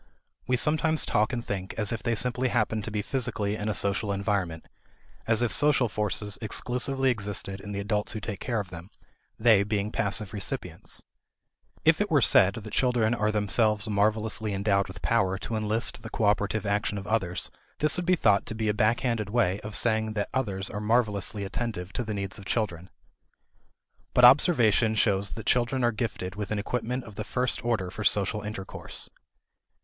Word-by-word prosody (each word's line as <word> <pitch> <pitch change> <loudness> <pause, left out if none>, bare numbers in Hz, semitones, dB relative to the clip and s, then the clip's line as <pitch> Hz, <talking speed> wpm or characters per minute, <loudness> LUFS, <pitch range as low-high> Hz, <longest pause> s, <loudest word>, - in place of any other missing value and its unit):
We 125 - +2
sometimes 155 +3 +2
talk 105 +3 +1
and 120 -2 -3
think 95 -1 -4
as 105 -3 +1
if 115 - -3
they 115 - 0
simply 125 +2 0
happened 110 -3 0
to 115 - -5
be 105 -1 -2
physically 115 -6 -1
in 105 0 -3
a 105 - 0
social 100 +2 +1
environment; 100 -5 -2 0.6
as 115 +1 +2
if 120 - 0
social 145 -4 +3
forces 105 -1 -2
exclusively 125 +4 0
existed 100 -3 -3
in 105 - -7
the 100 - -3
adults 105 +1 -1
who 110 - -4
take 105 -2 -5
care 120 -3 -1
of 100 -3 -6
them, 85 +2 -9 0.5
they 110 -3 +5
being 105 0 -1
passive 100 -1 -1
recipients. 100 -2 -3 0.8
If - - +5
it - - 0
were - - +4
said 100 +1 +5
that 110 -1 -8
children 120 -3 +2
are 105 -2 +1
themselves 105 +1 +2
marvelously 105 0 0
endowed 100 0 +1
with 95 - -10
power 95 -5 +2
to 115 - -5
enlist 110 +1 -1
the 115 - -8
cooperative 105 0 0
attention 105 0 0
of 100 - -6
others, 95 -6 -1 0.3
this 150 -1 +2
would 175 -1 -3
be 185 - +5
thought 105 - +2
to 110 - -3
be 110 -1 -1
a - - +2
backhanded 110 0 +1
way 105 -4 +1
of 105 0 -6
saying 110 -2 +2
that 105 -1 -2
others 100 -7 -2
are 105 - -5
marvelously 105 -2 +1
attentive 100 -3 -4
to 125 - -2
the 110 -2 -4
needs 100 0 -4
of 100 - -11
children. 95 -4 -2 1.3
But 125 - +7
observation 120 - +5
shows 100 -2 +1
that 110 - -7
children 125 +1 +1
are 120 - +3
gifted 105 -5 -4
with 105 0 -5
an 110 - -1
equipment 125 +4 -2
of 110 - -11
the - - -5
first 125 -2 -2
order 110 -7 -1
for 110 - -6
social 105 +1 +2
intercourse. 105 -2 -5
105 Hz, 185 wpm, -27 LUFS, 100-115 Hz, 1.3 s, But